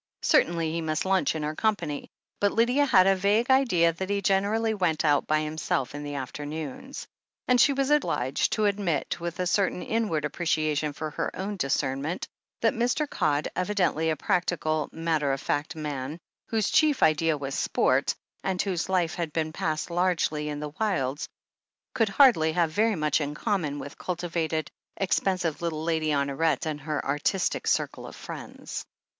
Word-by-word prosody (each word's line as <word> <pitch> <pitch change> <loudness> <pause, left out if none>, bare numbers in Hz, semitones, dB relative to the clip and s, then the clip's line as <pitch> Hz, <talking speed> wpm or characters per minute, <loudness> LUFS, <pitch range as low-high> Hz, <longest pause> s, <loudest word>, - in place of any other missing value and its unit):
Certainly 165 -1 +3
he 165 +1 -2
must 155 +1 -1
lunch 190 -3 +2
in 155 - -3
her 150 +1 -2
company, 200 -7 -1 0.3
but 205 0 +3
Lydia 250 +6 +3
had 185 -7 +6
a 195 0 +5
vague 210 +7 +2
idea 180 -11 +4
that 190 +3 -5
he 205 0 +1
generally 205 +3 +1
went 170 -6 0
out 145 -2 +3
by 155 0 +2
himself 155 -4 -2
in 145 - -5
the 145 0 -5
afternoons. 145 - -6 0.4
And 250 -1 +5
she 285 - +6
was 275 +1 0
obliged 140 - +1
to 215 - +1
admit, 200 -7 0
with 170 +1 -5
a 180 - +1
certain 180 0 +1
inward 210 -10 0
appreciation 155 -2 0
for 155 +1 -5
her - - -2
own 200 +2 -3
discernment, 140 0 -1 0.3
that 225 - +3
Mr. 245 +6 0
Codd, 150 - 0
evidently 180 -4 +1
a 160 - +1
practical, 165 -4 0
matter 160 -3 0
of 135 - -2
fact 145 +4 -2
man, 150 -1 -4 0.3
whose 220 -3 0
chief 300 -3 +4
idea 155 0 +3
was 135 -1 -5
sport, - - +1 0.3
and 190 -1 -1
whose 185 -2 -1
life 180 -4 +1
had 170 -3 -3
been 155 0 -2
passed 155 +1 -2
largely 170 -4 0
in 145 -1 -4
the 150 -1 -6
wilds, 145 -10 -1 0.6
could 225 -4 +2
hardly 195 - +5
have 170 -2 +1
very 215 +5 +2
much 155 -1 +1
in 145 0 -3
common 165 -8 -1
with 145 0 -8
cultivated, 165 -3 -2 0.3
expensive 185 -4 0
little 160 -2 -2
Lady 160 -1 0
Honoret 140 +1 +1
and 150 -2 -3
her 150 0 -3
artistic 145 +7 0
circle - - 0
of - - -10
friends. - - -7
165 Hz, 170 wpm, -27 LUFS, 150-195 Hz, 0.6 s, had